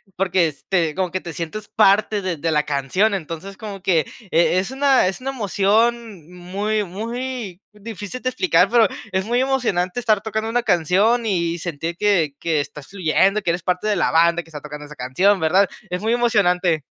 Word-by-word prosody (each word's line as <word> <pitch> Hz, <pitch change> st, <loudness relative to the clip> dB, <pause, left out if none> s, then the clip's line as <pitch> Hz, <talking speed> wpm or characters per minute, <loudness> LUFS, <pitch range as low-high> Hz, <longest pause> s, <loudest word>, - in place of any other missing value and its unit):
Porque 185 Hz, -2 st, +2 dB
es 145 Hz, -3 st, -10 dB
te 165 Hz, -5 st, +1 dB
como 185 Hz, -3 st, -1 dB
que 185 Hz, -, -2 dB
te 170 Hz, -2 st, -7 dB
sientes 175 Hz, +6 st, -6 dB
parte 210 Hz, 0 st, +3 dB
de 180 Hz, -4 st, -3 dB
de 165 Hz, +2 st, -1 dB
la 150 Hz, -1 st, +2 dB
canción. 150 Hz, +10 st, 0 dB
Entonces, 180 Hz, +2 st, -6 dB
como 205 Hz, -4 st, -8 dB
que 165 Hz, -6 st, +2 dB, 0.3 s
e 170 Hz, +2 st, +3 dB
es 195 Hz, +7 st, -3 dB
una, 270 Hz, -6 st, +3 dB
es 190 Hz, -, -3 dB
una 270 Hz, +1 st, -3 dB
emoción 215 Hz, -, 0 dB
muy 200 Hz, +4 st, -2 dB
muy 225 Hz, 0 st, -5 dB
difícil 210 Hz, +2 st, -8 dB
de 255 Hz, -, 0 dB
explicar, 365 Hz, +8 st, +2 dB
pero 230 Hz, -3 st, +5 dB, 0.2 s
es 190 Hz, +1 st, -1 dB
muy 240 Hz, +2 st, +1 dB
emocionante 245 Hz, -7 st, 0 dB
estar 215 Hz, -4 st, +2 dB
tocando 220 Hz, +1 st, -3 dB
una 240 Hz, +1 st, 0 dB
canción 200 Hz, +6 st, +2 dB
y 170 Hz, -4 st, 0 dB
sentir 165 Hz, 0 st, -5 dB
que 175 Hz, -9 st, +1 dB
que 160 Hz, -3 st, 0 dB
estás 145 Hz, -1 st, -9 dB
fluyendo, 195 Hz, +2 st, +1 dB
que 175 Hz, -, -2 dB
eres 175 Hz, 0 st, -3 dB
parte 180 Hz, +3 st, -1 dB
de 210 Hz, -, +2 dB
la -, -, +1 dB
banda 170 Hz, +1 st, +3 dB
que 165 Hz, -, -20 dB
está 150 Hz, -2 st, -8 dB
tocando 150 Hz, 0 st, -8 dB
esa 150 Hz, 0 st, -12 dB
canción, 180 Hz, +11 st, +2 dB
¿verdad? 185 Hz, +5 st, +3 dB, 0.2 s
Es 180 Hz, +2 st, -3 dB
muy 225 Hz, +2 st, +1 dB
emocionante. 180 Hz, -, +2 dB
190 Hz, 195 wpm, -21 LUFS, 170-215 Hz, 0.3 s, pero